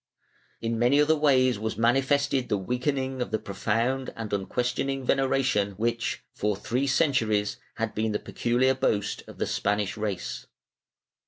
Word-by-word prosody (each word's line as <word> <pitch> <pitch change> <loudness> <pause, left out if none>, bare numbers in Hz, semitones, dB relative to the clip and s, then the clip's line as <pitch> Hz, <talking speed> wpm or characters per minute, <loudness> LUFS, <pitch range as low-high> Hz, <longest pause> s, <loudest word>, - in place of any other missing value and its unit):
In 115 0 -1
many 125 +5 +4
other 150 +2 +4
ways 130 -6 +3
was 110 0 -3
manifested 135 +3 +2
the 105 - +2
weakening 130 +5 -2
of - - -2
the 110 - 0
profound 115 +6 -1
and 110 -2 -5
unquestioning 125 +6 -1
veneration 130 -7 +1
which, 115 +4 -2
for 105 0 0
three 125 +7 -1
centuries, 115 -8 +1 0.2
had 115 -1 -2
been 110 0 0
the 105 - 0
peculiar 125 +4 +1
boast 105 -6 0
of - - -11
the - - 0
Spanish 105 -1 -1
race. 105 -4 -4
120 Hz, 145 wpm, -27 LUFS, 105-135 Hz, 0.2 s, many